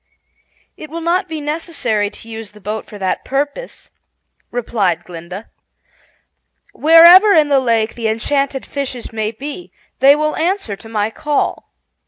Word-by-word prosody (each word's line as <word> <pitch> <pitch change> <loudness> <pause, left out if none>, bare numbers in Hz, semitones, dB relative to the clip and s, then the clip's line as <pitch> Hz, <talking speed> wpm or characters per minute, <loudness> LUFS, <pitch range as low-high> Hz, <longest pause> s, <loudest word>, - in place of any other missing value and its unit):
"It 310 - -10
will 330 +2 -6
not 355 +3 0
be 320 -1 -4
necessary 290 - -2
to 225 - -13
use 225 -2 -8
the 210 - -15
boat 210 +2 -5
for 210 - -10
that 190 -2 -2
purpose," 285 - -4 0.6
replied 200 -8 -1
Glinda. 180 +4 -9 1.3
"Wherever 340 +6 +8
in 305 -4 +4
the 280 -1 +4
lake 230 -3 0
the 230 -2 -3
enchanted 270 +5 -1
fishes 260 -5 -5
may 215 -1 -1
be, 285 +10 -8 0.3
they 275 +2 +7
will 305 0 -1
answer 335 - -1
to 225 +3 -14
my 215 -1 -1
call. 295 +4 -2
260 Hz, 145 wpm, -17 LUFS, 220-305 Hz, 1.3 s, Wherever